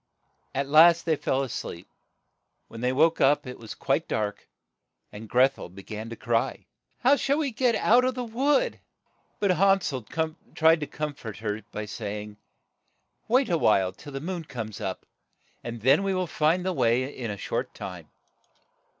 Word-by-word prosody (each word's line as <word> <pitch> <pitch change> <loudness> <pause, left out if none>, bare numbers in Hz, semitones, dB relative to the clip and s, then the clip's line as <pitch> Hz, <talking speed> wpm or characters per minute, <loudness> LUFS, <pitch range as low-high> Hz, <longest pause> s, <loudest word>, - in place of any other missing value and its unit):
At 140 +1 0
last 165 +3 +6
they 160 -2 +2
fell 135 -1 0
a - - -3
sleep. - - -6 0.8
When 115 - -9
they 125 +1 +1
woke 160 +5 +3
up 145 +2 +4
it 125 0 -8
was 115 -2 -8
quite - - 0
dark, 105 -1 -3 0.6
and 105 +1 -10
Greth 130 +2 +3
el - - -7
be 95 +2 -12
gan 110 +3 -7
to 115 - -6
cry, 115 0 -1 0.4
"How 265 +3 +5
shall 280 0 +1
we 295 -4 0
get 240 0 +2
out 240 +4 +4
of 255 0 0
the 250 - -3
wood?' 280 - +1 0.6
But 200 -2 +2
Han 195 +2 +4
sel 130 -6 -3 0.5
tried 160 +1 +5
to 150 - -4
corn 150 -1 -4
fort 115 -7 -8
her 105 0 -3
by 105 - -4
say 105 0 -5
ing, 105 0 -12 0.3
' - - -49
' - - -47
Wait 255 +3 +3
a 170 - +2
while 95 -7 +3
till 145 +7 -12
the 135 - -3
moon 170 +2 -5
comes 115 -7 -6
up, - - -4 0.6
and 120 -1 -6
then 130 - +5
we 195 -1 0
will 185 0 0
find 165 +2 +1
the 185 - 0
way 120 -4 +2
in 120 -3 -4
a 100 - -4
short - - -3
time." 90 -5 -8
140 Hz, 195 wpm, -26 LUFS, 110-185 Hz, 0.8 s, last